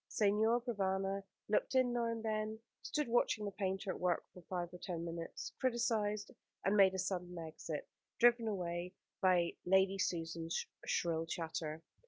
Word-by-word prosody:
Signor 220 Hz, +3 st, +3 dB
Provana 195 Hz, -4 st, 0 dB, 0.3 s
looked 210 Hz, +5 st, +1 dB
in 255 Hz, -2 st, +4 dB
now 240 Hz, -1 st, +1 dB
and 230 Hz, -1 st, -2 dB
then, 215 Hz, 0 st, -1 dB, 0.2 s
stood 300 Hz, -3 st, -1 dB
watching 230 Hz, -2 st, +2 dB
the 200 Hz, -, -2 dB
painter 190 Hz, 0 st, -1 dB
at -, -, -6 dB
work 180 Hz, -2 st, +1 dB
for 180 Hz, -, -11 dB
five 175 Hz, 0 st, -4 dB
or 180 Hz, -, -8 dB
ten 170 Hz, -2 st, -4 dB
minutes, 165 Hz, 0 st, -5 dB
criticised, 225 Hz, -5 st, +1 dB, 0.3 s
and 195 Hz, -, +4 dB
made 190 Hz, -2 st, +6 dB
a -, -, -1 dB
sudden 180 Hz, -1 st, -2 dB
exit, 160 Hz, -1 st, -5 dB, 0.3 s
driven 235 Hz, -1 st, +5 dB
away 180 Hz, -2 st, -2 dB, 0.3 s
by 180 Hz, -2 st, +4 dB
Lady 190 Hz, +1 st, +4 dB
Susan's 165 Hz, -2 st, -1 dB, 0.2 s
shrill 165 Hz, -1 st, +1 dB
chatter. 160 Hz, -1 st, -3 dB
190 Hz, 155 wpm, -37 LUFS, 175-215 Hz, 0.3 s, made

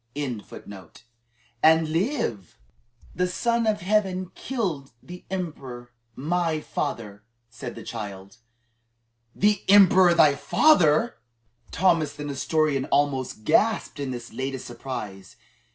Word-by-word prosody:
"The 105 Hz, -, -7 dB, 2.3 s
Son 235 Hz, +5 st, 0 dB
of 215 Hz, -3 st, 0 dB
Heaven 185 Hz, -2 st, 0 dB
killed 180 Hz, -, -4 dB
the 180 Hz, +1 st, -11 dB
emperor, 135 Hz, -10 st, -6 dB, 0.2 s
my 165 Hz, +2 st, -1 dB
father," 105 Hz, -8 st, -5 dB, 0.3 s
said 115 Hz, -, -8 dB
the -, -, -9 dB
child. 100 Hz, -2 st, -8 dB, 1.0 s
"The 205 Hz, -1 st, +2 dB
emperor 190 Hz, -3 st, +7 dB
thy 155 Hz, -4 st, +6 dB
father!" 180 Hz, -, +3 dB, 0.5 s
Thomas 165 Hz, -5 st, +2 dB
the 145 Hz, +1 st, -8 dB
Nestorian 145 Hz, 0 st, 0 dB
almost 135 Hz, -6 st, 0 dB
gasped 220 Hz, -, +1 dB
in 140 Hz, -2 st, -3 dB
this 120 Hz, -1 st, -7 dB
latest 130 Hz, -1 st, -4 dB
surprise. 110 Hz, -6 st, -7 dB
150 Hz, 95 wpm, -25 LUFS, 125-185 Hz, 2.3 s, emperor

